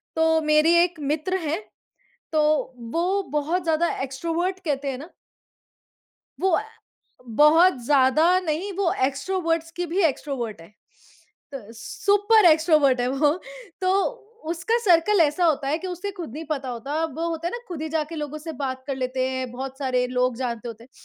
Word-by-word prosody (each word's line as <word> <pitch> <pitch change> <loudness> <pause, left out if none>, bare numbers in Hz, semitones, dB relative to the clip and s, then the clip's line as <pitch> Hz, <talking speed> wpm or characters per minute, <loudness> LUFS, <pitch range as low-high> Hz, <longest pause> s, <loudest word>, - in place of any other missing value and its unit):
तो 320 0 +3
मेरी 305 +2 +4
एक 350 -2 -3
मित्र 310 +6 -1
हैं, 325 +1 -2 0.7
तो 310 -1 +2 0.5
वो 365 +4 +1
बहुत 315 +5 0
ज़्यादा 330 +1 +1
एक्स्ट्रोवर्ट 335 +8 -2
कहते 285 -2 -1
हैं 255 - -5
ना। 300 +6 -10 1.3
वो 380 - +2
अ, - - -1 0.6
बहुत 300 +7 +5
ज़्यादा 290 +6 +4
नहीं, 360 +3 -3
वो 380 -2 0
एक्स्ट्रोवर्टस 330 +3 -2
की 355 0 -2
भी 385 +3 +2
एक्स्ट्रोवर्ट 265 - -2
है। 165 +5 -15 0.8
त 225 -5 -8
सुपर 410 - +3
एक्स्ट्रोवर्ट 310 -5 +4
है 245 - +1
वो 285 +2 +3 0.5
तो 370 - +2 0.6
उसका 410 +8 0
सर्कल 360 +2 +4
ऐसा 320 +3 +3
होता 295 -4 +1
है 305 +3 0
कि 370 - -7
उसे 360 +3 -4
खुद 335 -10 -7
नहीं 315 +2 -6
पता 275 -3 -2
होता। 275 +7 -3
वो 325 +2 -3
होता 330 0 -3
है - - -7
ना 480 - -3
खुद 335 -4 -5
ही 315 - -3
जाके 310 +1 -1
लोगों 300 0 -5
से 320 +1 -7
बात 260 -1 -3
कर 275 - -3
लेते 255 0 -1
हैं। 260 -1 -3
बहुत 265 +1 -6
सारे 255 -3 0
लोग 250 -1 0
जानते 240 -2 -4
होते 230 0 -9
हैं। 255 - -23
310 Hz, 170 wpm, -24 LUFS, 265-345 Hz, 1.3 s, बहुत